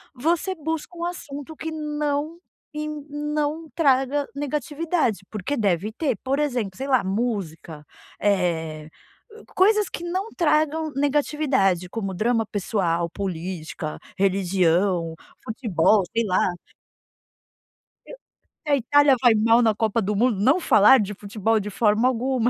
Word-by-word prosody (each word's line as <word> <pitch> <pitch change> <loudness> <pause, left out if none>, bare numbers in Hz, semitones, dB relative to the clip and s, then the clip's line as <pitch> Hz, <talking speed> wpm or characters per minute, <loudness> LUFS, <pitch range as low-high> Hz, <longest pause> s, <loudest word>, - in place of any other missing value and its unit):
você 335 +8 0
busca 320 +2 -5
um 340 - -3
assunto 310 -4 -7
que 320 +1 -5
não 300 0 -2 0.4
e 305 0 -3
não 300 +1 -3
traga 280 -2 +2
negatividade, 295 - -1
porque 215 +7 -3
deve 200 - 0
ter. 260 -1 -1
Por 270 +2 0
exemplo, 250 -9 -1
sei 270 - -5
lá, 260 -3 +3
música. 190 -7 -3 0.3
Eh, 165 -6 -1 0.4
hã, 440 +1 -14
coisas 420 +1 +4
que - - -6
não 370 +5 -3
tragam 310 -1 +1
negatividade, 275 - +1
como 195 -1 -4
drama 225 +2 +1
pessoal, 180 -5 -1
política, 170 -4 -5 0.2
religião, 185 -2 +1 0.3
futebol, 215 -3 +2
sei 230 0 +2
lá. 185 -2 +2 1.6
E - - -11 0.3
se 305 - -13
a - - +7
Itália 280 +2 +4
vai 245 -3 +6
mal 225 +2 +4
na 225 -2 +3
Copa 220 +1 0
do 210 +1 -1
Mundo, 225 -1 +2
não 265 - +4
falar 220 - +6
de 210 -1 -2
futebol 210 +2 -1
de 210 0 -5
forma 215 +3 +2
alguma. 255 -1 +1
245 Hz, 135 wpm, -23 LUFS, 195-295 Hz, 1.6 s, a